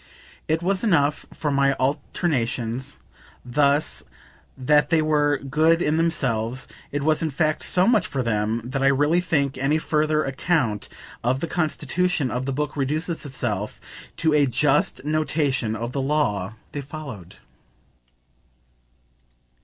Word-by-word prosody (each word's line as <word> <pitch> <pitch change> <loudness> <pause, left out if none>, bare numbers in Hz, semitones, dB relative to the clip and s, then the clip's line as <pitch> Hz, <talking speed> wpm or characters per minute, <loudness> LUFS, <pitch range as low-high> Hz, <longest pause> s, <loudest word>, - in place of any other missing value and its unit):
It 160 +2 0
was 190 +2 0
enough 150 -9 +2
for 150 - -2
my 140 0 +3
alternations, 130 -3 -2 0.5
thus, 140 +4 +1 0.6
that 150 +3 +3
they 165 -2 +4
were 150 -2 +2
good 155 +5 +2
in 155 -2 +1
themselves; 130 -7 0 0.2
it 145 0 -2
was 155 +1 +2
in 160 - 0
fact 155 +1 0
so 180 0 +3
much 225 -2 +3
for 130 -2 -2
them 110 0 0
that 130 +3 -3
I 135 - +4
really 145 +5 +3
think 140 -7 0
any 140 +4 +2
further 155 -1 +1
account 135 - 0 0.3
of 125 +3 +1
the 170 - -2
constitution 170 -3 0
of 125 +3 -2
the - - 0
book 150 +2 -2
reduces 155 +4 -2
itself 110 -7 -3 0.4
to 160 -1 +2
a 145 -2 +4
just 135 +1 +1
notation 145 -6 0
of 120 +2 -4
the 135 - -2
law 110 -9 0 0.2
they 145 - -4
followed. 135 - -9
145 Hz, 140 wpm, -23 LUFS, 130-155 Hz, 0.6 s, they